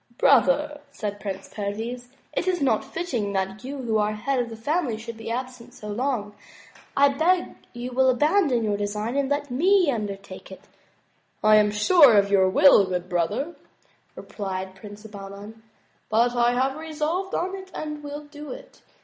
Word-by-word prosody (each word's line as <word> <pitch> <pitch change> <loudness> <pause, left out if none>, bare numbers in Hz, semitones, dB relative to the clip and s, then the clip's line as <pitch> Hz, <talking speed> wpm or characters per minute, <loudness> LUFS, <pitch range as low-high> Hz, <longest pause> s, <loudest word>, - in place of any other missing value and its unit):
"Brother," 290 +3 +3
said 205 -6 -5
Prince 195 -1 -6
Perviz," 225 +4 -4 0.3
it 350 - -2
is 365 -1 +1
not 260 -7 +2
fitting 245 - -3
that 195 +3 -2
you 275 +3 -6
who 220 -2 +1
are 210 0 +1
the - - -7
head 270 +4 -1
of 240 -1 -1
the 225 - -7
family 260 +1 -1
should 230 +1 -8
be 225 0 -8
absent 250 0 -5
so 210 - -9
long. 220 -2 -2 0.6
I 280 0 +6
beg 340 +6 +1 0.2
you 245 +1 -6
will 260 +1 +3
abandon 295 - +2
your 205 -2 0
design 210 +4 -3
and 280 -1 0
let 285 -1 -1
me 355 +4 +3
undertake 200 -5 -6
it." 190 - -11 0.4
" - - -41
I - - +8
am 210 0 +4
sure 235 - +6
of 200 0 +3
your 190 -2 +5
good - - -5
will, 190 -9 +6
brother," 185 - -2 0.6
replied 190 -2 -5
Prince 205 +2 -12
Bahman, 205 +1 -10 0.5
"but 235 +3 +2
I 240 0 +3
have 265 +3 0
resolved 320 +4 -3
on 370 +2 -2
it 380 -1 -10
and 300 -1 -5
will 290 +1 -6
do 295 0 -10
it. - - -11
240 Hz, 175 wpm, -24 LUFS, 210-290 Hz, 0.6 s, I